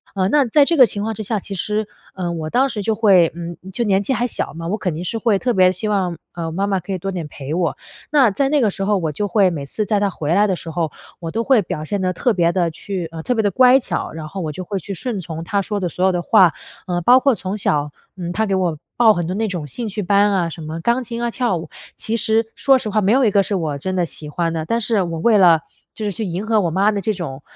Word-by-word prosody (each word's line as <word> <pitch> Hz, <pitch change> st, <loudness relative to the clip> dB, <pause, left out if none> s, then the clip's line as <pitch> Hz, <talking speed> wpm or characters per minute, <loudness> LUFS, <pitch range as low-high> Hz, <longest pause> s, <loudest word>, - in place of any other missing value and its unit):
嗯， 190 Hz, 0 st, +1 dB
那 290 Hz, -3 st, +4 dB
在 285 Hz, +5 st, +4 dB
这 335 Hz, -, +1 dB
个 260 Hz, -, +9 dB
情 205 Hz, +2 st, -4 dB
况 225 Hz, -, -2 dB
之 220 Hz, -, -6 dB
下， 215 Hz, +1 st, -1 dB
其 200 Hz, -, -7 dB
实， 210 Hz, +3 st, -2 dB, 0.3 s
嗯， 175 Hz, -2 st, -3 dB
我 155 Hz, -, -4 dB
当 260 Hz, +9 st, +2 dB
时 215 Hz, -4 st, -4 dB
就 220 Hz, +2 st, 0 dB
会 190 Hz, -7 st, +4 dB
嗯， 170 Hz, 0 st, -6 dB, 0.2 s
就 240 Hz, -, 0 dB
年 195 Hz, -3 st, +2 dB
纪 205 Hz, -, -2 dB
还 240 Hz, 0 st, 0 dB
小 235 Hz, -, -2 dB
嘛， 165 Hz, +1 st, -6 dB
我 210 Hz, -, -1 dB
肯 180 Hz, -6 st, -2 dB
定 170 Hz, -, -5 dB
是 225 Hz, +5 st, -3 dB
会 220 Hz, -4 st, +2 dB
特 245 Hz, +3 st, 0 dB
别 185 Hz, -1 st, +5 dB
希 215 Hz, +4 st, -4 dB
望， 185 Hz, -4 st, 0 dB, 0.2 s
嗯， 165 Hz, -2 st, -4 dB
妈 195 Hz, +3 st, 0 dB
妈 195 Hz, -2 st, 0 dB
可 180 Hz, +3 st, -8 dB
以 -, -, -1 dB
多 195 Hz, +2 st, -4 dB
点 175 Hz, -5 st, -4 dB
陪 145 Hz, 0 st, -7 dB
我。 175 Hz, -1 st, -1 dB, 0.3 s
那 270 Hz, -8 st, +5 dB
在 270 Hz, +8 st, +1 dB
那 295 Hz, 0 st, +3 dB
个 220 Hz, -, +3 dB
时 195 Hz, -, -4 dB
候 205 Hz, 0 st, +2 dB
我 165 Hz, -4 st, -2 dB
就 205 Hz, +8 st, -2 dB
会 200 Hz, -1 st, +3 dB
每 150 Hz, -4 st, -4 dB
次 215 Hz, +10 st, -3 dB
在 210 Hz, -1 st, +1 dB
她 200 Hz, -1 st, +1 dB
回 160 Hz, -3 st, -2 dB
来 205 Hz, +3 st, +4 dB
的 190 Hz, -, 0 dB
时 170 Hz, -, -8 dB
候， 160 Hz, -1 st, -2 dB, 0.3 s
我 165 Hz, -1 st, -5 dB
都 225 Hz, +5 st, -1 dB
会 255 Hz, -3 st, +4 dB
表 155 Hz, -4 st, -5 dB
现 200 Hz, +3 st, -2 dB
得 185 Hz, -, +1 dB
特 240 Hz, +7 st, +1 dB
别 170 Hz, -3 st, +2 dB
地 175 Hz, -3 st, +1 dB
去 180 Hz, +1 st, -5 dB
呃， 165 Hz, -1 st, -6 dB
特 250 Hz, -, 0 dB
别 220 Hz, -, +1 dB
地 205 Hz, -, +1 dB
乖 255 Hz, 0 st, +6 dB
巧， -, -, -3 dB
然 160 Hz, -1 st, -7 dB
后 195 Hz, -, -6 dB
我 155 Hz, -2 st, -3 dB
就 185 Hz, +5 st, -6 dB
会 195 Hz, +1 st, -4 dB
去 195 Hz, -, -6 dB
顺 225 Hz, 0 st, -3 dB
从 165 Hz, -1 st, -6 dB
她 200 Hz, +4 st, 0 dB
说 205 Hz, +1 st, -3 dB
的 180 Hz, -, -1 dB
所 180 Hz, +2 st, -1 dB
有 190 Hz, -, +4 dB
的 175 Hz, -, -1 dB
话。 180 Hz, -1 st, +5 dB, 0.3 s
嗯， 175 Hz, -1 st, -2 dB
包 250 Hz, +7 st, +7 dB
括 270 Hz, -3 st, +2 dB
从 190 Hz, +1 st, -4 dB
小， 150 Hz, -6 st, 0 dB, 0.2 s
嗯， 175 Hz, -2 st, -5 dB
她 220 Hz, +4 st, 0 dB
给 195 Hz, -, +1 dB
我 175 Hz, -4 st, 0 dB, 0.2 s
报 225 Hz, -3 st, +6 dB
很 175 Hz, -2 st, -2 dB
多 185 Hz, -, -3 dB
那 220 Hz, +1 st, 0 dB
种 175 Hz, -6 st, -4 dB
兴 230 Hz, -, -5 dB
趣 210 Hz, +1 st, -4 dB
班 200 Hz, +2 st, +3 dB
啊， 175 Hz, -3 st, +1 dB
什 165 Hz, -, -9 dB
么 160 Hz, +1 st, -5 dB
钢 235 Hz, +7 st, +1 dB
琴 235 Hz, 0 st, -5 dB
啊、 240 Hz, -, 0 dB
跳 240 Hz, -4 st, 0 dB
舞。 160 Hz, -1 st, -8 dB, 0.3 s
其 225 Hz, -, -2 dB
实 220 Hz, 0 st, +2 dB
说 270 Hz, -1 st, +4 dB
实 215 Hz, -, -4 dB
话 210 Hz, +1 st, +1 dB
没 195 Hz, -, +2 dB
有 260 Hz, +1 st, +4 dB
一 -, -, +4 dB
个 200 Hz, 0 st, +4 dB
是 205 Hz, -, -3 dB
我 155 Hz, -6 st, -2 dB
真 185 Hz, +6 st, -3 dB
的 180 Hz, -, +1 dB
喜 150 Hz, -1 st, -6 dB
欢 165 Hz, +2 st, -1 dB
的， 160 Hz, -1 st, -3 dB
但 230 Hz, +8 st, 0 dB
是 215 Hz, -3 st, +1 dB
我 165 Hz, -2 st, -4 dB
为 220 Hz, +4 st, +4 dB
了 170 Hz, -5 st, +6 dB, 0.3 s
就 220 Hz, -, -7 dB
是 205 Hz, -, -1 dB
去 215 Hz, +3 st, -2 dB
迎 185 Hz, +4 st, -4 dB
合 220 Hz, -1 st, +2 dB
我 170 Hz, -, 0 dB
妈 195 Hz, +5 st, +3 dB
的 205 Hz, -, -2 dB
这 215 Hz, +3 st, 0 dB
种， 145 Hz, -7 st, -6 dB
195 Hz, 320 characters per minute, -20 LUFS, 170-220 Hz, 0.3 s, 个